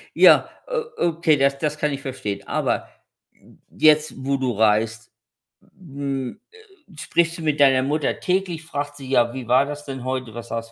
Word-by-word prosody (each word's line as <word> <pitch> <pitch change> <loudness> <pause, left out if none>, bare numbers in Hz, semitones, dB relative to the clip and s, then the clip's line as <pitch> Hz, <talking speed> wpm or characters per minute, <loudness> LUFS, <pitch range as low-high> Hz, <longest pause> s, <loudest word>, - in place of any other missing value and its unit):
Ja, - - +6 0.5
o - - +2
okay, 165 -2 +2
das 140 0 +2
das 150 0 -2
kann 150 -1 0
ich 140 0 -5
verstehen. 105 -7 -5
Aber - - -1 0.4
j - - -22 0.2
jetzt, 155 0 +4
wo 140 +1 +1
du 130 -2 -1
reist, 110 0 +1 0.7
hm, 140 - -5
äh, 390 - -20
sprichst 170 +1 0
du - - -8
mit 150 -1 0
deiner 135 -2 +5
Mutter 145 +1 -1
täglich? 180 -3 -1
Fragt 145 -2 -5
sie: 135 -2 -9
„Ja, 120 -3 +2
wie 130 -2 -7
war 130 +3 +4
das 145 0 -7
denn 135 -3 -6
heute? 130 -3 -4
Was 120 0 -9
hast 115 0 -4
140 Hz, 180 wpm, -22 LUFS, 130-155 Hz, 0.7 s, Ja